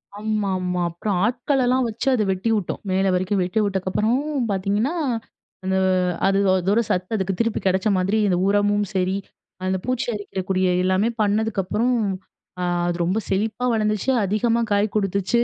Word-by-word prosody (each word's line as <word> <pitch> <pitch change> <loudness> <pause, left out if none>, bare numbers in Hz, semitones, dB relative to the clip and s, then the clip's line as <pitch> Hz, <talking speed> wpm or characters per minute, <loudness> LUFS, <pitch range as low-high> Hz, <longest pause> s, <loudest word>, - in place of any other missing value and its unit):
ஆமாமா, 195 -4 -1
அப்றம் 180 +3 -2
ஆட்கள்லாம் 255 +1 +1
வச்சு 225 +4 -5
அத 230 -4 +2
வெட்டி 190 +4 -1
விட்டோம். 205 -5 -3
மேல 190 +1 +2
வரைக்கும் 185 +2 +1
வெட்டி 180 +4 -1
விட்டக்கப்புறமும் 225 +9 0
பாத்தீங்கன்னா, 200 - 0 0.7
இந்த 190 0 +1 0.5
அது 195 0 +2 0.2
அதோட 190 +4 +2
சத்து 185 +5 -1
அதுக்கு 190 -1 -1
திருப்பி 230 -1 +1
கெடைச்ச 190 +2 +1
மாதிரி 190 +4 +1
இந்த 180 -2 +2
உரமும் 205 0 +2
சரி, 185 +1 +1 0.5
அந்த 190 0 +1
பூச்சி 255 -1 -1
அரிக்கிறக்கூடிய 190 -2 -1 0.2
எல்லாமே 185 +4 +2
பண்ணதுக்கப்றம், 215 +3 +1 0.7
அ - - -1 0.2
அது 175 -1 -1
ரொம்ப 185 +5 +1
செழிப்பா 215 +5 -1
வளந்துச்சு, 215 +2 +1
அதிகமா 225 +4 +1
காய் 205 +1 +1
கொடுத்துச்சு. 200 +2 +1
205 Hz, 140 wpm, -22 LUFS, 190-220 Hz, 0.7 s, அத